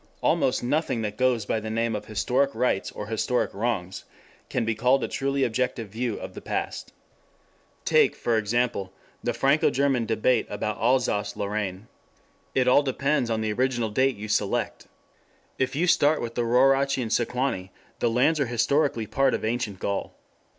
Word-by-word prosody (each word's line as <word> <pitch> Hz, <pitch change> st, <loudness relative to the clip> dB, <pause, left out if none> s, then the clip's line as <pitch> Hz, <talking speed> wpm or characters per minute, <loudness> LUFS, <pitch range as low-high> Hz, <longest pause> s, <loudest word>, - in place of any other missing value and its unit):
Almost -, -, +1 dB
nothing 130 Hz, -3 st, 0 dB
that 105 Hz, -1 st, -3 dB
goes 125 Hz, -3 st, +1 dB
by 110 Hz, -, 0 dB
the 110 Hz, 0 st, -6 dB
name 115 Hz, 0 st, 0 dB
of 105 Hz, 0 st, -5 dB
Historic 125 Hz, +6 st, 0 dB
Rights 115 Hz, -4 st, 0 dB
or 105 Hz, -, -6 dB
Historic 115 Hz, +3 st, -1 dB
Wrongs 100 Hz, -4 st, -2 dB, 0.5 s
can 115 Hz, -, -1 dB
be 115 Hz, -, +1 dB
called 125 Hz, +4 st, +2 dB
a -, -, 0 dB
truly 135 Hz, 0 st, -1 dB
objective 120 Hz, -2 st, -1 dB
view 115 Hz, +1 st, -3 dB
of -, -, -8 dB
the -, -, -9 dB
past. -, -, -4 dB, 0.9 s
Take, -, -, +4 dB
for 115 Hz, -, 0 dB
example, 110 Hz, -3 st, 0 dB, 0.3 s
the 120 Hz, -, 0 dB
Franco 135 Hz, +6 st, +3 dB
German 135 Hz, -4 st, +1 dB
debate 115 Hz, +2 st, +1 dB
about 105 Hz, +1 st, -3 dB
Alsace 120 Hz, -3 st, +1 dB
Lorraine. 100 Hz, 0 st, -3 dB, 0.7 s
It 130 Hz, -1 st, +2 dB
all 130 Hz, +3 st, +6 dB
depends 140 Hz, -2 st, 0 dB
on 110 Hz, -1 st, 0 dB
the 110 Hz, -1 st, -1 dB
original 120 Hz, -2 st, 0 dB
date 130 Hz, +4 st, +2 dB
you 105 Hz, +1 st, -7 dB
select. 105 Hz, -, -1 dB, 0.7 s
If 130 Hz, +1 st, 0 dB
you 165 Hz, +5 st, +1 dB
start 160 Hz, -3 st, +3 dB
with 115 Hz, -1 st, -4 dB
the 120 Hz, -, -1 dB
Rauraci 135 Hz, +2 st, +3 dB
and 110 Hz, -, -5 dB
Sequani, 120 Hz, -6 st, -1 dB, 0.3 s
the 120 Hz, -, +2 dB
lands 140 Hz, +7 st, +2 dB
are 140 Hz, -, +1 dB
historically 120 Hz, +1 st, +1 dB
part 135 Hz, +5 st, +2 dB
of -, -, -4 dB
Ancient 110 Hz, -3 st, -2 dB
Gaul. 100 Hz, +1 st, -3 dB
120 Hz, 170 wpm, -26 LUFS, 110-130 Hz, 0.9 s, all